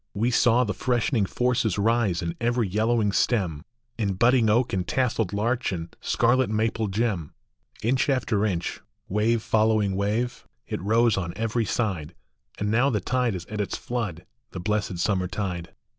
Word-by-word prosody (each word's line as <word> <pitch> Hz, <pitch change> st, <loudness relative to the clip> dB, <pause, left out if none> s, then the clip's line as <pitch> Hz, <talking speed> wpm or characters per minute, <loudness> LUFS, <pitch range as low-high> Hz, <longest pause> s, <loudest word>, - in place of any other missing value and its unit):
We 115 Hz, +5 st, +1 dB
saw 120 Hz, +1 st, +4 dB
the 105 Hz, -3 st, -2 dB
freshening 120 Hz, -1 st, 0 dB
forces 120 Hz, -1 st, 0 dB
rise 105 Hz, -4 st, +1 dB
in 85 Hz, 0 st, -3 dB
every 120 Hz, -2 st, +1 dB
yellowing 110 Hz, +2 st, +1 dB
stem, 95 Hz, -10 st, 0 dB, 0.4 s
In 100 Hz, -3 st, 0 dB
budding 120 Hz, +2 st, +4 dB
oak 120 Hz, +4 st, +2 dB
and 90 Hz, -2 st, -1 dB
tasselled 120 Hz, -6 st, 0 dB
larch 115 Hz, +5 st, 0 dB
and 85 Hz, -2 st, -6 dB
scarlet 125 Hz, +1 st, +2 dB
maple 110 Hz, 0 st, 0 dB
gem. 95 Hz, -6 st, -2 dB, 0.5 s
Inch 130 Hz, +5 st, +1 dB
after 120 Hz, -6 st, +1 dB
inch, 90 Hz, -5 st, -2 dB, 0.3 s
wave 110 Hz, +3 st, +1 dB
following 110 Hz, -3 st, +2 dB
wave, 105 Hz, +5 st, -1 dB, 0.2 s
it -, -, -4 dB
rose 115 Hz, +2 st, +3 dB
on 85 Hz, -2 st, -3 dB
every 115 Hz, +1 st, -1 dB
side; 90 Hz, -10 st, -2 dB, 0.4 s
And 105 Hz, 0 st, -1 dB
now 120 Hz, +5 st, +3 dB
the 110 Hz, -6 st, 0 dB
tide 125 Hz, +2 st, 0 dB
is 90 Hz, -1 st, -6 dB
at 105 Hz, +2 st, -4 dB
its 100 Hz, -, -3 dB
flood, 100 Hz, -9 st, -4 dB, 0.2 s
the 90 Hz, -, -7 dB
blessed 100 Hz, -1 st, -1 dB
summer 95 Hz, +1 st, 0 dB
tide. 90 Hz, -3 st, -4 dB
110 Hz, 160 wpm, -25 LUFS, 95-120 Hz, 0.5 s, saw